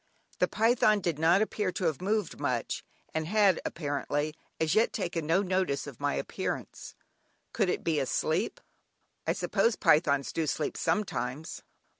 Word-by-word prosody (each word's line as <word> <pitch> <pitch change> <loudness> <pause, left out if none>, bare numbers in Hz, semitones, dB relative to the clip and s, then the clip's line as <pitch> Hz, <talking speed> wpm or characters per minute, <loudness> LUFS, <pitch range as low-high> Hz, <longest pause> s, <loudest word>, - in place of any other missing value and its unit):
The - - +4
python 220 -1 +3
did 170 -5 -2
not 170 +6 +5
appear 210 -3 -1
to - - -4
have 160 -2 0
moved 210 0 -1
much, 125 -5 -2 0.3
and 160 0 -1
had, 200 -2 +4
apparently, 145 -1 -2 0.3
as 160 -1 +1
yet 220 +2 +3
taken 170 -6 -2
no 175 +5 +3
notice 185 -6 0
of - - -9
my - - 0
appearance; - - -4 0.6
could 200 -5 +1
it - - -1
be 160 -3 +1
asleep? 160 - 0 0.7
I - - +3
suppose 230 -1 +1
pythons 150 -5 +3
do 160 -2 -1
sleep 150 0 -1
sometimes? 155 - -2
165 Hz, 150 wpm, -29 LUFS, 150-200 Hz, 0.7 s, not